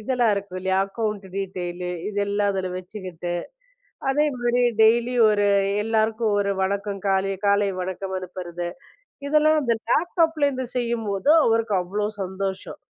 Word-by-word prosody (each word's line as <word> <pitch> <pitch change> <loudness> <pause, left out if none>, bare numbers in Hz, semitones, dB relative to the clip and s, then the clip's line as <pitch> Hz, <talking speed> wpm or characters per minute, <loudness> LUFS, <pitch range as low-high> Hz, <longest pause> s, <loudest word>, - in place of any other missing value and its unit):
இதெல்லாம் 240 -1 +2
இருக்கும் 200 -2 -5
இல்லியா? 190 0 +1
அக்கவுன்ட் 210 -1 -3
டீடெயில் 180 -2 -4 0.2
இதெல்லாம் 205 0 0
அதுல 190 -1 -2
வச்சுக்கிட்டு, 180 -2 -6 0.8
அதே 295 +3 +2
மாதிரி 245 0 +1 0.2
டெய்லி 235 +3 +4 0.2
ஒரு 205 -1 +2 0.4
எல்லாருக்கும் 220 0 +1
ஒரு 200 0 0
வணக்கம். 200 +1 -2
காலை 195 0 +1
காலை 200 0 +3
வணக்கம் 190 +1 -4
அனுப்புறது, 175 -1 -6 0.6
இதெல்லாம் 305 +1 +4
அந்த 235 -4 +1
லேப்டாப்ல 325 -1 +2
இருந்து 260 -2 -4
செய்யும்போது 235 0 0
அவருக்கு 225 -2 +2
அவ்ளோ 205 +4 -2 0.2
சந்தோஷம். 190 0 -5
205 Hz, 125 wpm, -24 LUFS, 190-235 Hz, 0.8 s, டெய்லி